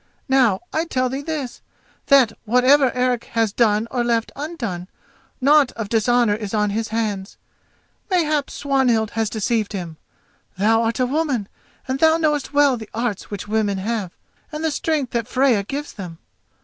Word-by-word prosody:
Now 255 -8 +3
I 320 +1 0
tell 255 -5 0
thee 270 +2 -4
this, 285 -5 -5 0.5
that, 270 -5 +5
whatever 255 +4 +4
Eric 250 -1 0
has 225 -3 +1
done 220 -1 +2
or 245 -2 0
left 230 -1 0
undone, 240 - -5 0.5
naught 285 0 +4
of 220 -3 -5
dishonour 235 0 +2
is 210 0 -4
on 210 -1 +1
his 220 +2 -2
hands. 210 -3 -3 0.7
Mayhap 310 -6 +1
Swanhild 250 -6 +1
has 225 -2 -1
deceived 220 0 -1
him—thou 195 +4 -3
art 230 +1 -1
a 255 - +3
woman, 270 -6 -1 0.4
and 260 +1 -2
thou 320 +1 +5
knowest 300 -4 0
well 285 -3 +4
the 220 -2 -9
arts 230 -4 -3
which 205 -1 -6
women 210 -2 0
have, 205 -1 -2 0.4
and 305 +1 -5
the 320 - +1
strength 295 -3 -1
that 235 -2 -2
Freya 255 -5 +2
gives 280 +9 -5
them. 180 -5 -8
235 Hz, 160 wpm, -21 LUFS, 215-275 Hz, 0.7 s, that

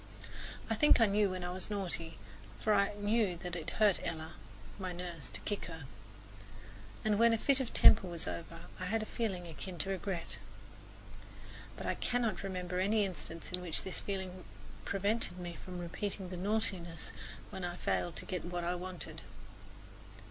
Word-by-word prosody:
I 225 - +1
think 300 +6 +6
I 225 - +8
knew 205 0 +3
when 185 -1 -3
I 175 - -2
was 185 +3 -3
naughty, 175 -5 -1 0.4
for 215 - +3
I 200 0 +3
knew 205 -3 +2
that 175 0 -4
it 170 -1 -3
hurt 210 -3 +6
Ella, 160 -2 -3 0.5
my 185 -2 -2
nurse, 175 -4 -5
to - - -3
kick 205 - -2
her, 165 -3 -7 1.2
and 210 -1 +3
when 235 0 +8
my 230 - +4
fit 275 +4 +4
of 265 - -2
temper 210 -4 +8
was 170 -2 -1
over 165 0 -5 0.2
I 185 - -2
had 220 +3 +1
a - - -4
feeling 200 -7 -2
akin 175 +2 -6
to 195 +5 -1
regret. 190 -2 -2 1.4
But - - -5
I - - +2
cannot 235 -7 0
remember 180 -2 -2
any 205 +2 +4
instance 170 -3 -5
in 180 0 +2
which 175 -3 +1
this 190 - -2
feeling 190 -2 -4 0.4
prevented 200 0 +1
me 175 -2 -5
from 180 -1 -6
repeating 185 +2 -3
the 185 - -4
naughtiness 185 - -1 0.4
when 190 - -5
I 175 0 -2
failed 175 -2 0
to - - -2
get 180 -2 -2
what 175 0 -2
I 175 +1 +1
wanted. 180 0 -5
185 Hz, 175 wpm, -34 LUFS, 175-205 Hz, 1.4 s, I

